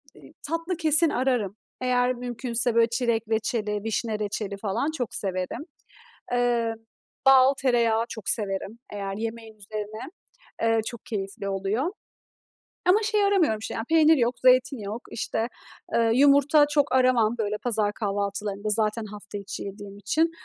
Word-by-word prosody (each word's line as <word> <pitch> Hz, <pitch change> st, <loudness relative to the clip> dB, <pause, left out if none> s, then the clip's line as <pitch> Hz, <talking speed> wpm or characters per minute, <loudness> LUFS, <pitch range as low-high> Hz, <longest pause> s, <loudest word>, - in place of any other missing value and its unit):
eee, -, -, -16 dB, 0.2 s
tatlı 330 Hz, +2 st, -2 dB
kesin 315 Hz, 0 st, +4 dB
ararım. 245 Hz, -8 st, 0 dB, 0.3 s
Eğer 250 Hz, 0 st, +2 dB
mümkünse 240 Hz, -1 st, 0 dB
böyle, 230 Hz, 0 st, +5 dB
çilek 235 Hz, -2 st, 0 dB
reçeli, 215 Hz, -2 st, -1 dB
vişne 220 Hz, 0 st, -2 dB
reçeli 205 Hz, -1 st, -3 dB
falan 220 Hz, +9 st, -1 dB
çok 245 Hz, -3 st, -3 dB
severim. 185 Hz, +8 st, -3 dB, 0.7 s
Eee, 240 Hz, -2 st, +1 dB, 0.5 s
bal, 270 Hz, 0 st, +7 dB
tereyağı 235 Hz, -4 st, +2 dB
çok 220 Hz, -3 st, -5 dB
severim 200 Hz, +1 st, -2 dB
eğer 195 Hz, -1 st, -4 dB
yemeğin 225 Hz, 0 st, -6 dB
üzerine, 215 Hz, +1 st, -6 dB, 0.6 s
eee, 225 Hz, 0 st, +3 dB
çok 235 Hz, -1 st, -7 dB
keyifli 200 Hz, -1 st, -4 dB
oluyor. 200 Hz, -, -1 dB, 0.9 s
Ama 370 Hz, +4 st, +5 dB
şey 425 Hz, -1 st, +2 dB
aramıyorum 350 Hz, -, +2 dB
işte 215 Hz, -, -6 dB
ya, 225 Hz, -, -3 dB
peynir 320 Hz, -1 st, +5 dB
yok, 240 Hz, 0 st, +1 dB
zeytin 255 Hz, +1 st, +5 dB
yok, 210 Hz, +3 st, -5 dB
işte, 225 Hz, 0 st, -2 dB, 0.5 s
eee, 230 Hz, -1 st, +3 dB
yumurta 285 Hz, +2 st, +5 dB
çok 290 Hz, -2 st, +1 dB
aramam 250 Hz, -3 st, +3 dB
böyle 210 Hz, -1 st, -1 dB
pazar 215 Hz, -4 st, +1 dB
kahvaltılarında 205 Hz, 0 st, -3 dB
zaten 215 Hz, +1 st, 0 dB
hafta 205 Hz, 0 st, -8 dB
içi 200 Hz, 0 st, -6 dB
yediğim 200 Hz, 0 st, -8 dB
için. 310 Hz, -, +1 dB
230 Hz, 140 wpm, -26 LUFS, 210-255 Hz, 0.9 s, bal